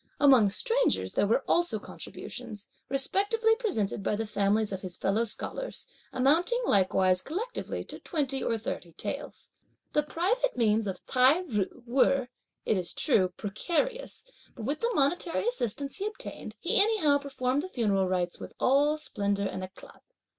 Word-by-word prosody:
Among 260 -8 +6
strangers, - - +1
there - - +2
were 235 +6 +2
also 345 0 +2
contributions, 210 0 -8 0.2
respectively 405 - +2
presented 225 - -1
by 210 - 0
the 225 +2 -2
families 210 +1 +1
of 190 -1 -4
his 185 -2 -4
fellow 215 +4 +1
scholars, - - -3 0.3
amounting, 325 - +3
likewise, 185 - +3
collectively 445 +11 -4
to - - -9
twenty 275 -6 -2
or 230 - 0
thirty 205 -7 -6
taels. - - -6 0.4
The 300 - +4
private 380 - 0
means 220 -2 +2
of 190 - -5
Tai 265 +7 +4
ju 230 - -3
were, 260 +1 +2 0.4
it 215 - +2
is 180 -2 -3
true, 200 - +3
precarious, 345 - -2 0.3
but 225 - -7
with 285 +4 -1
the 470 +1 0
monetary 335 +7 +1
assistance 280 - -2
he 405 +1 -2
obtained, 430 - -7
he 460 -3 +3
anyhow 400 -10 +3
performed 270 -1 -1
the 370 - -7
funeral 200 - +1
rites 180 -1 -1
with - - -9
all 290 +4 +3
splendour 200 -9 -1
and 190 - -4
éclat. 185 +1 -11
265 Hz, 155 wpm, -29 LUFS, -, 0.4 s, Among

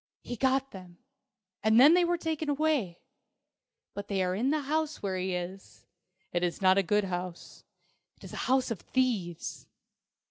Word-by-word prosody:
"He 245 - -5
got 265 +2 +1
them 180 -2 -12 0.6
and 220 +1 +4
then 290 +6 +8
they 355 0 +5
were 345 0 +1
taken 320 -2 -3
away. 285 - 0 1.0
But 200 0 -6
they 195 -2 0
are 180 0 0
in 230 +8 0
the 305 +1 +1
house 310 0 -2
where 190 -2 -1
he 185 0 -2
is. 180 +2 -7 0.5
It 175 - +1
is 175 -1 -1
not 190 0 +5
a - - +5
good 210 +3 +1
house. 180 -2 -6 0.5
It - - -20
is - - -10
a - - -4
house 260 -1 +2
of 215 - -3
thieves. 210 -11 -2
210 Hz, 175 wpm, -29 LUFS, 185-280 Hz, 1.0 s, then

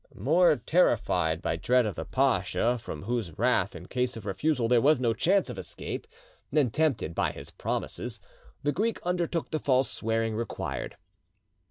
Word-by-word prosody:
More 160 - +4
terrified 90 - +2
by 80 - 0
dread 125 +7 +3
of 105 - -2
the - - -5
pacha, 120 +1 +1
from 75 -9 -7
whose 110 -7 -3
wrath - - +2
in - - -8
case 125 -1 -1
of 110 - -9
refusal 120 +5 0
there 120 0 +4
was 150 +1 +4
no 120 -3 +2
chance 195 - +2
of - - -6
escape, - - -6 0.4
than 145 -7 +2
tempted 150 - 0
by - - 0
his - - -10
promises, - - -4 0.4
the 145 - +2
Greek 225 +7 -1
undertook 175 -2 -1
the 155 - 0
false 130 -2 +2
swearing 115 0 -1
required. 115 +1 -4
125 Hz, 165 wpm, -28 LUFS, 110-155 Hz, 0.4 s, More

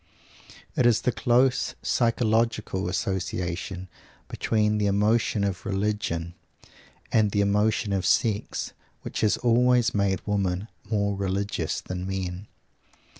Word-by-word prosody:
It 125 - +4
is 115 -3 +3
the 125 - +1
close 125 +2 +2
psychological 110 -5 +1
association 90 0 -3 0.4
between 105 -1 +1
the 105 - +2
emotion 105 +2 +2
of 100 -3 -2
religion 95 -4 -2 0.8
and 110 -2 +3
the 100 0 +1
emotion 105 +1 +1
of 95 -2 0
sex 105 +3 0 0.3
which - - -4
has 110 - +3
always 125 0 +3
made 100 -3 +1
women 100 0 -1 0.2
more 100 -2 +1
religious 95 -3 -2
than 90 0 -5
men. 95 0 -4
100 Hz, 115 wpm, -26 LUFS, 95-110 Hz, 0.8 s, It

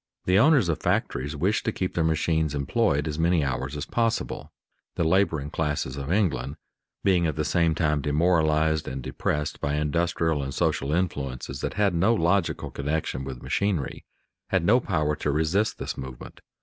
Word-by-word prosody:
The 90 +2 +4
owners 135 - +5
of 85 -4 0
factories 70 +5 -1
wished 95 +8 0
to 110 - +1
keep 95 -3 -3
their 85 - +1
machines 80 -1 +1
employed 75 - +1
as 75 0 -3
many 85 -1 +3
hours 65 +2 -2
as 75 - -4
possible; 115 +4 -1 0.4
the - - 0
laboring 80 -4 +1
classes 75 -4 -2
of 70 +2 -4
England, 75 -9 0 0.5
being 90 -4 +3
at 80 - -2
the 75 0 -1
same 85 -2 +2
time 75 -3 +1
demoralized 80 0 +2
and 65 0 -5
depressed 75 +3 -2
by 70 +1 0
industrial 80 0 0
and 70 -1 -5
social 70 +2 0
influences 70 -7 -2
that - - -3
had 100 -2 +2
no 95 +8 +3
logical 85 -1 0
connection 70 -1 -2
with 65 -2 -7
machinery, 80 +1 -1 0.5
had - - +1
no 120 +6 +5
power 75 -9 0
to 75 - -2
resist 80 +9 +1
this - - -4
movement. 65 -2 -9
80 Hz, 170 wpm, -26 LUFS, 70-90 Hz, 0.5 s, owners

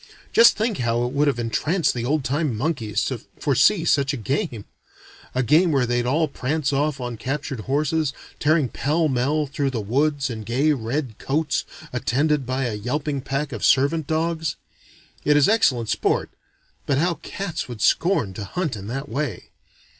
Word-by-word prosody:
Just 230 - +7
think 220 -2 -1
how 120 0 +1
it 125 - -4
would 145 +1 +2
have 140 - +1
entranced 140 - 0
the 120 -1 -3
old 150 +2 +1
time 140 -3 -1
monkeys 120 -6 -1
to - - -3 0.2
foresee - - +3
such 140 0 +2
a - - -5
game! 125 - -2 0.7
A 130 - +2
game 160 +7 +4
where 135 -4 +2
they'd 120 0 0
all 155 +5 +2
prance 140 +1 -1
off 145 0 0
on 120 -2 -4
captured 135 +1 -3
horses, 145 +5 0 0.3
tearing 155 -2 +3
pell 155 +7 0
mell 145 +3 +1
through 140 0 -1
the 125 -4 -3
woods 140 +5 0
in 110 -1 -5
gay 125 +8 +1
red 125 -1 -3
coats, 150 +2 -1 0.3
attended 140 +3 +1
by 130 -1 -1
yelping 135 +7 -2
packs 140 +2 -3
of - - -5
servant 140 +3 +3
dogs. 160 0 -1 0.7
It 150 0 +4
is 145 - +5
excellent 135 - +2
sport - - 0 0.6
but 140 - +2
how 170 +3 +1
cats 180 -6 -4
would 120 -3 -8
scorn 165 - +2
to 100 - -6
hunt 155 - -2
in 100 -1 -8
that 135 +5 -4
way! 140 -6 -4
140 Hz, 170 wpm, -23 LUFS, 120-155 Hz, 0.7 s, Just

